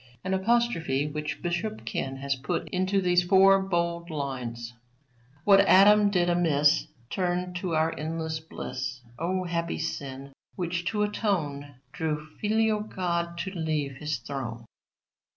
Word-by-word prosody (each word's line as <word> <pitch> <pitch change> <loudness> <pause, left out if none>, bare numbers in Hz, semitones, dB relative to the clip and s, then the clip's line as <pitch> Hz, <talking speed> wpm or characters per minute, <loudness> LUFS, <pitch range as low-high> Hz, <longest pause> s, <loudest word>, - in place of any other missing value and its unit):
An 190 - -1
apostrophe 190 - +1
which 150 0 -4
Bishop 175 +5 -2
Ken 135 0 -3
has 140 +1 -1
put 140 +7 -3
into 190 +2 +1
these 180 -1 +4
four 195 +2 +6
bold 170 -2 -1
lines 125 -6 -4 0.7
"What 200 +1 +7
Adam 205 +1 +6
did 180 -3 +2
amiss, 160 -4 +3 0.2
Turned 180 -1 -1
to 180 -2 -2
our 160 +1 +2
endless 160 0 -3
bliss; 130 -4 -6 0.2
O 185 +3 -1
happy 170 -1 -2
sin, 140 -3 -5 0.2
which 175 -1 -2
to 210 +4 0
atone, 155 - -2 0.2
Drew 150 -1 -2
Filial 220 0 +2
God 170 -4 -2
to 190 - -4
leave 155 -6 -2
His 150 +1 -2
throne." 120 -2 -6
170 Hz, 135 wpm, -27 LUFS, 145-190 Hz, 0.7 s, What